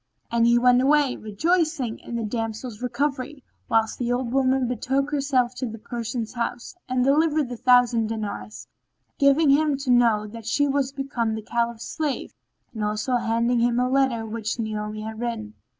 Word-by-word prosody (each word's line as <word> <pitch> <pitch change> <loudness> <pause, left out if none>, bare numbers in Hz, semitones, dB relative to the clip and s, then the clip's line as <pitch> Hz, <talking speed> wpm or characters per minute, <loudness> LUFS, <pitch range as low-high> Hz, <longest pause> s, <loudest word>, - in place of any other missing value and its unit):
And 235 0 +3
he 235 0 +5
went 250 +1 +5
away, 285 -1 +3
rejoicing 285 - 0
in 235 - -7
the 230 - -2
damsel's 225 +1 -4
recovery, 270 +2 -2 0.3
whilst 225 0 +1
the 245 -1 -1
old 245 -1 -1
woman 265 -1 +2
betook 265 +4 -1
herself 270 -4 +1
to 255 - -2
the 225 0 -7
Persian's 230 0 -5
house 240 +3 -4 0.2
and 255 0 +1
delivered 300 0 +2
the 245 - -5
thousand 245 -2 +4
dinars, 215 -1 -5 0.5
giving 280 +1 +5
him 295 0 +3
to 270 -2 -1
know 230 -4 +4
that 220 +1 -9
she 285 +5 +2
was 275 -1 0
become 260 -5 -2
the 220 - -6
Caliph's 235 0 -2
slave 300 -4 -3 0.4
and 220 -2 -4
also 215 +4 0
handing 235 +1 +1
him 240 +1 +2
a 250 - +2
letter 260 -4 +1
which 220 0 -3
Naomi 215 -1 -4
had 220 0 -6
written. 230 -3 -4
245 Hz, 170 wpm, -24 LUFS, 225-270 Hz, 0.5 s, he